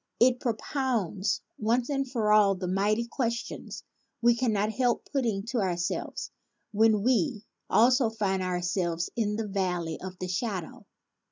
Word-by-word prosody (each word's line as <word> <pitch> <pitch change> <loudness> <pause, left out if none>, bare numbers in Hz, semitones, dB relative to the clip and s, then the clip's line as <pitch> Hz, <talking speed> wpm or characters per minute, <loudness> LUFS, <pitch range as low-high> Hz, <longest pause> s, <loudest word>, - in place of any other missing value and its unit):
It 245 +1 +5
propounds, 225 - -1 0.2
once 235 +5 +1 0.2
for 220 -4 +1
all, 205 -2 +5
the 185 0 -4
mighty 205 +5 +1
questions 235 -1 -4 0.4
we 240 0 +5
cannot 220 -4 +1
help 245 0 0
putting 230 -8 0
to 245 -1 0
ourselves 175 -3 -2 0.4
when 215 -1 +3
we 245 -2 +1 0.2
also 245 +1 +4
find 200 -4 -1
ourselves 180 -2 -1
in 210 -3 0
the 220 0 -3
valley 180 -5 -2
of 185 0 -7
the 185 - -4
shadow. 185 -2 -4
215 Hz, 135 wpm, -28 LUFS, 185-235 Hz, 0.4 s, It